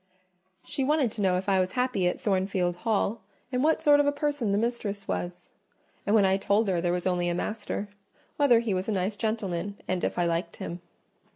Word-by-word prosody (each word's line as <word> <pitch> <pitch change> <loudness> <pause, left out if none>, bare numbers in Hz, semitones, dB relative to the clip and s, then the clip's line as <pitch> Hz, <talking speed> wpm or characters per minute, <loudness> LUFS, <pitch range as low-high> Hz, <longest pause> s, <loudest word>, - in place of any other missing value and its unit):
She 275 - -2
wanted 285 -4 +2
to 215 - -5
know 185 -2 +3
if 185 - -4
I 195 -1 +3
was 185 0 0
happy 250 -8 +1
at 180 - -1
Thornfield 190 -3 0
Hall, 220 +2 0 0.3
and 250 0 0
what 315 +1 +2
sort 290 -1 +6
of 290 - +3
a - - +4
person 285 -6 -1
the 200 - +2
mistress 210 -3 -2
was; 175 0 -4 0.6
and 205 - +4
when 205 -3 +5
I 190 0 +3
told 200 +2 +2
her 175 -3 +1
there 175 0 +1
was 180 0 -2
only 175 -1 +1
a 175 - -1
master, 210 +1 -3 0.5
whether 250 -6 +5
he 225 -4 -1
was 185 +3 -2
a - - +1
nice 195 +2 -1
gentleman, 200 -3 -2
and 185 -1 -1
if - - -1
I 175 - +2
liked 170 0 -1
him. 175 +1 -6
200 Hz, 215 wpm, -27 LUFS, 180-235 Hz, 0.6 s, sort